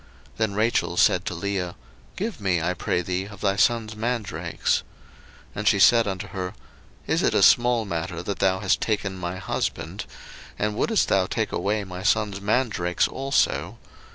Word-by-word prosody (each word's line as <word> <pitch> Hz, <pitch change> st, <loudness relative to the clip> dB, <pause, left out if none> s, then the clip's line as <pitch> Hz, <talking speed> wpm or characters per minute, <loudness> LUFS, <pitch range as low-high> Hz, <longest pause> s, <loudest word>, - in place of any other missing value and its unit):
Then 110 Hz, -3 st, 0 dB
Rachel 110 Hz, +3 st, +1 dB
said -, -, +4 dB
to -, -, -3 dB
Leah, 90 Hz, -1 st, -3 dB, 0.4 s
Give 210 Hz, -, -4 dB
me, 95 Hz, -3 st, +1 dB
I 85 Hz, +3 st, 0 dB
pray 90 Hz, 0 st, -1 dB
thee, 90 Hz, +2 st, -2 dB
of 100 Hz, -2 st, -12 dB
thy 100 Hz, -2 st, +2 dB
son's 110 Hz, 0 st, +1 dB
mandrakes. 115 Hz, -1 st, -1 dB, 0.7 s
01:030:015 -, -, -28 dB
And 105 Hz, +1 st, -3 dB
she 105 Hz, -, +5 dB
said 115 Hz, +3 st, +6 dB
unto 95 Hz, +1 st, -3 dB
her, 95 Hz, -2 st, -5 dB, 0.5 s
Is -, -, +1 dB
it -, -, +2 dB
a -, -, +4 dB
small 120 Hz, -2 st, +5 dB
matter 85 Hz, -1 st, -4 dB
that 100 Hz, +1 st, -4 dB
thou 95 Hz, 0 st, +2 dB
hast 100 Hz, -, +1 dB
taken 100 Hz, -3 st, -1 dB
my 90 Hz, 0 st, -3 dB
husband? 95 Hz, -, -3 dB, 0.5 s
and 105 Hz, 0 st, -1 dB
wouldest 220 Hz, -, +2 dB
thou 95 Hz, -1 st, +2 dB
take 110 Hz, +1 st, -2 dB
away 105 Hz, +1 st, -1 dB
my 90 Hz, -1 st, -7 dB
son's 105 Hz, -1 st, +1 dB
mandrakes 105 Hz, -5 st, +1 dB
also? 135 Hz, +1 st, 0 dB
100 Hz, 170 wpm, -24 LUFS, 95-110 Hz, 0.7 s, said